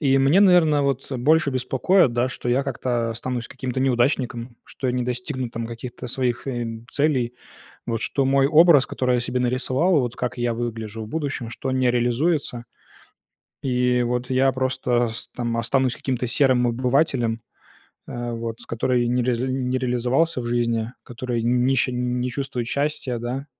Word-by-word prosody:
И 135 -3 +3
мне, 140 +8 +4
наверно, 170 -7 +5
вот 135 0 -2
больше 150 +4 +3
беспокоит, 130 +4 +2
да, 120 +2 +1
что 125 - -6
я 130 +3 +2
как-то 120 -3 -1
останусь 120 +1 -4
каким-то 130 -1 -5
неудачником, 125 -2 0
что 130 - -4
я - - +1
не 125 0 -1
достигну 125 +1 -3
там 115 0 -5
каких-то 120 +2 -7
своих, 125 +1 -1
э, 120 -3 -2 0.2
целей. 130 -5 +1 0.5
Вот 115 -1 -1
что 140 - 0
мой 135 0 +3
образ, 155 -1 +6
который 125 -2 0
я - - +1
себе 125 +1 -2
нарисовал, 130 +7 +1
вот 120 -1 -3
как 125 0 -3
я 120 -1 0
выгляжу 115 -2 -4
в - - -8
будущем, 140 -4 -3
что 130 +3 -5
он 130 0 0
не 125 -1 +3
реализуется, 120 +1 0 1.0
и 125 -1 +1
вот 125 +1 -2
я 130 +1 +3
просто 130 -2 0
с 110 -2 -5
там 120 -1 -2
останусь 130 +2 +1
каким-то 125 -2 -2
серым 125 -1 +3
обывателем, 125 -2 +1 0.7
э, 120 0 -4
вот, 115 -1 -4
который 120 +1 0
не 125 +1 +1
ре 125 0 +1
не 130 +1 -1
реализовался 125 +4 +1
в 120 - -5
жизни, 120 -1 0
который 120 -1 -4
не 125 +3 +2
ще 130 0 +1
не 125 0 -1
чувствует 135 -2 -3
счастья, 140 -4 -1
да, 125 +4 -4
125 Hz, 170 wpm, -23 LUFS, 120-135 Hz, 1.0 s, образ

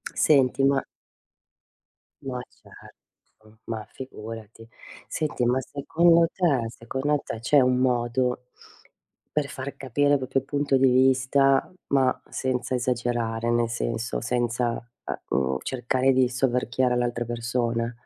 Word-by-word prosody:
Senti 135 -2 +3
ma 135 0 +3 1.4
Ma 130 -2 -4
certo, 110 0 -20
ma 110 -1 -4
figurati. 115 -3 -9 0.4
Senti 155 -5 -2
ma 125 +2 +2
secondo 165 +5 +3
te 140 -11 +1
secondo 135 +6 -2
te 110 - -5
c'è 140 +6 +4
un 125 0 +3
modo 125 0 0 0.9
per 150 -2 0
far 135 0 -6
capire 145 +2 +1
il - - +5
proprio 130 +1 -1
punto 140 -1 +1
di 130 0 +4
vista, 130 +2 +3 0.2
ma 135 -2 +2
senza 130 0 -2
esagerare, 120 -2 -1
nel 120 -1 +2
senso, 115 0 -2
senza, 120 0 0 0.6
uhm, 65 - +2
uhm, 65 0 0
cercare 130 +1 +1
di 130 -1 +4
soverchiare 125 0 +1
l'altra 120 -1 -1
persona? 115 0 -1
125 Hz, 120 wpm, -25 LUFS, 120-135 Hz, 1.4 s, il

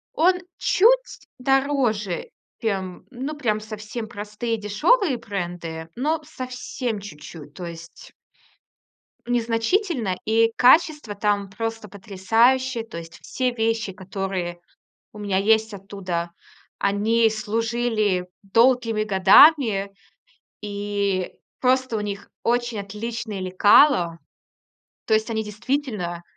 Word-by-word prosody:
Он 360 +3 +3 0.2
чуть - - +2
дороже, 255 -8 0 0.3
чем, 190 -5 -3
ну, 270 +5 -5
прям 215 -7 0
совсем 215 +1 -7
простые 210 +3 -4
дешёвые 255 - +2
бренды, 175 -6 -5
но 305 +5 0
совсем 250 -5 -5
чуть-чуть. 150 -5 -11
То 180 - -7
есть... 170 0 -11 1.2
незначительно, 235 - 0
и 225 +1 +3
качество 295 -4 +4
там 205 -1 0
просто 225 +1 -5
потрясающее. 230 +6 +1
То 220 -7 -9
есть 165 0 -10
все 255 -1 -1
вещи, 225 -2 -1
которые 190 -2 -4 0.5
у 210 - -12
меня 200 -2 0
есть 220 +1 +2
оттуда, 185 -3 -4 0.5
они 220 +3 +2
служили 215 -3 -1
долгими 230 +1 +3
годами, 210 - +5 0.7
и 200 -2 -2 0.3
просто 255 -2 +2
у - - -2
них 205 -1 -5
очень 240 -2 0
отличные 215 +1 -5
лекало. 185 - +4 0.9
То 220 - +3
есть, 220 +2 +1
они 220 -1 -1
действительно 210 -6 -3
215 Hz, 100 wpm, -23 LUFS, 195-245 Hz, 1.2 s, годами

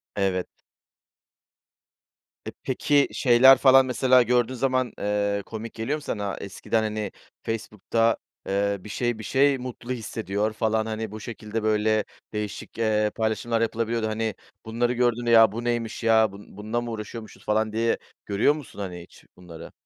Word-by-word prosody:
Evet. 95 -2 0 2.0
E, - - -3
peki, 145 -1 +2
şeyler 130 +2 +6
falan 135 -1 +6
mesela 130 0 +4
gördüğün 120 +1 +1
zaman, 130 0 0
eee, 100 0 0
komik 110 0 -7
geliyor 130 +7 -2
mu - - -10
sana? 100 -7 -3
Eskiden, 110 +3 -2
hani, 105 -2 -3 0.3
Facebook'ta, 115 +1 0 0.3
eee, 100 +1 0
"bir 105 - -12
şey, 120 +1 -1
bir 110 - -7
şey 135 +4 +3
mutlu 125 -1 -7
hissediyor" 110 -3 -2
falan, 110 0 0
hani, 110 -1 -4
bu 110 - -7
şekilde 110 -1 -5
böyle 110 0 +2 0.3
değişik, 105 -2 -5
eee, 105 -2 +1
paylaşımlar 115 +1 0
yapılabiliyordu. 115 0 -1
Hani, 110 0 -2 0.3
bunları 120 +2 0
gördüğünde, 120 -1 +1
"Ya, 115 -2 +7
bu 115 +3 -5
neymiş, 120 -1 -2
ya? 110 -2 +4
Bun 100 0 -14
bununla 110 +3 -2
mı 120 -1 -5
uğraşıyormuşuz?" 110 0 -8
falan, 110 0 +1
diye 115 +1 +1 0.3
görüyor 105 +8 +3
musun, 150 -8 -10
hani, 90 -3 -5
hiç 85 - -17
bunları? 85 -2 -11
110 Hz, 150 wpm, -25 LUFS, 105-120 Hz, 2.0 s, Ya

